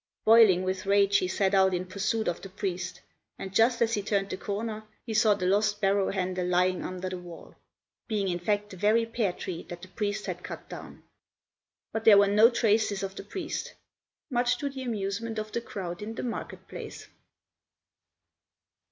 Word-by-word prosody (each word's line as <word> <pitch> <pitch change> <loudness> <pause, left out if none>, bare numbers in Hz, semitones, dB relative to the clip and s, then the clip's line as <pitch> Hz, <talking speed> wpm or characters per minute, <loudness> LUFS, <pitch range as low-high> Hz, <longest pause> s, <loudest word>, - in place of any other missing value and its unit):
Boiling 215 -5 +7
with 185 +1 -3
rage, 200 0 +4
he 185 - -1
set 190 +1 +1
out 190 -1 +4
in 180 +1 -2
pursuit 215 +4 -1
of 175 - -1
the 195 - -8
priest, 185 -2 -4 0.4
and 190 - -7
just 230 +3 +4
as 230 0 0
he 205 - +1
turned 200 -1 -1
the - - -1
corner 215 +3 -4 0.2
he 225 - -4
saw 215 -1 +4
the 185 -2 -3
lost 205 +2 +2
barrow 195 -1 +2
handle 185 -1 -1
lying 180 +1 +2
under 185 0 -4
the 185 -1 -4
wall, 175 -1 -12 0.5
being 210 -4 0
in 175 -1 -1
fact 205 +3 -1
the 190 - -9
very 215 +4 +3
pear 225 -4 0
tree 175 -1 -6
that 175 0 -8
the - - -8
priest 205 +1 -2
had - - -5
cut - - -8
down. - - -10 0.9
But 225 - -2
there 210 -2 +9
were 200 - +7
no 210 +3 +6
traces 215 -4 +1
of 195 0 -3
the - - -8
priest 315 - -5 0.6
much 245 0 +2
to 285 - -2
the 270 -1 -7
amusement 220 -1 -3
of 215 0 -4
the 235 - -2
crowd 180 -6 -6
in 220 +2 -5
the - - -4
market 240 - -5
place. - - -8
200 Hz, 190 wpm, -28 LUFS, 185-220 Hz, 0.9 s, there